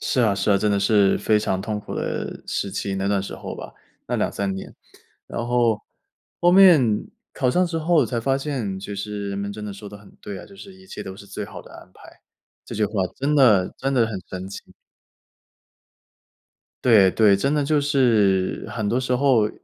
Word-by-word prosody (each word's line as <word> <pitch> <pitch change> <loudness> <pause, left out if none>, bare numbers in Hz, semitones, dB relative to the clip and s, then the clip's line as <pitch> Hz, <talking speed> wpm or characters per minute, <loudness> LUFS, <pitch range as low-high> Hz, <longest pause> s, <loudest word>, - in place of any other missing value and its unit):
是 125 - 0
啊 105 -4 +3
是 100 +1 0
啊， 100 - +4
真 105 +1 +1
的 100 - +2
是 100 -1 +3
非 110 -1 +2
常 95 -3 -1
痛 105 0 -3
苦 - - -8
的 - - -4
时 100 - -2
期， 100 0 -3
那 95 +1 -1
段 100 -1 +1
时 100 - -7
候 - - -7
吧， - - -9 0.3
那 - - -1
2-3 100 -1 -1
年， 95 - -8 0.5
然 120 - -4
后， 120 -3 +2 0.6
后 175 +1 +4
面， 160 - +6 0.3
考 125 - 0
上 180 +8 +2
之 165 -1 -3
后 160 0 +3
才 120 -2 -2
发 135 +3 +1
现 130 -9 -3
就 100 +1 -7
是 100 0 -5
人 100 - -4
们 100 0 -3
真 105 0 -7
的 105 - -5
说 100 +1 -10
得 105 - -10
很 100 -1 -17
对 100 -2 -7
啊， - - -10
就 195 - -16
是 195 -1 -12
一 190 0 -18
切 - - -7
都 95 0 -8
是 100 - -13
最 100 +1 -6
好 - - -10
的 - - -16
安 - - -14
排。 - - -17 0.4
这 - - -8
句 105 - +1
话 105 - -5 0.2
真 145 +3 0
的 105 -10 +4
真 135 +1 -1
的 115 -3 +3
很 100 -4 -5
神 95 +1 -6
奇。 100 - -7 2.2
对 105 -6 +6
对， 105 -3 +4
真 140 +8 0
的 150 -1 +1
就 150 +1 +2
是 115 -10 +2
很 110 -3 -2
多 120 +4 +1
时 125 -1 0
候 125 -5 +3
110 Hz, 225 characters per minute, -23 LUFS, 100-135 Hz, 2.2 s, 面